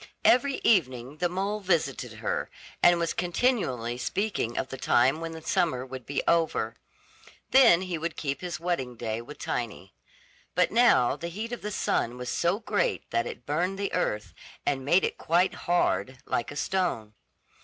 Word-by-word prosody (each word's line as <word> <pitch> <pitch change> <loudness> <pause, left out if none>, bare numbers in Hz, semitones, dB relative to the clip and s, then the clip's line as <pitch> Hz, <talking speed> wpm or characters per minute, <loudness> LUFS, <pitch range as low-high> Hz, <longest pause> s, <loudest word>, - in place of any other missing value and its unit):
Every 270 +2 +5
evening 130 - +2
the 175 +2 0
mole 195 +4 -2
visited 180 -5 0
her, - - -3 0.3
and 175 0 +6
was 170 -1 -1
continually 175 - 0
speaking 195 - -2
of 130 - -2
the 135 - -6
time 135 +6 +3
when 165 0 -4
the 160 -1 -9
summer 160 -10 0
would 130 -2 -9
be 140 - -1
over. 165 -1 +1 0.8
Then 235 -10 +7
he 180 -3 -3
would 165 +1 -4
keep 140 -2 -3
his 175 -1 -4
wedding 160 -8 -2
day 110 0 -3
with 135 +5 -11
Tiny; 105 -5 -4 0.6
but 180 0 +3
now 220 - +4
the 170 +3 -6
heat 215 +7 -5
of 240 - -5
the 210 - -4
sun 125 - -1
was 125 -1 -5
so 175 +4 +1
great 210 -2 -1
that 115 0 0
it 120 - -8
burned 175 +6 -1
the 200 0 -3
earth, 105 - -1 0.3
and 135 -2 0
made 170 +7 +4
it - - -2
quite 175 +3 +2 0.2
hard, 130 - +1
like 120 - -1
a 145 - -8
stone. 170 - -1
165 Hz, 175 wpm, -27 LUFS, 125-185 Hz, 0.8 s, Then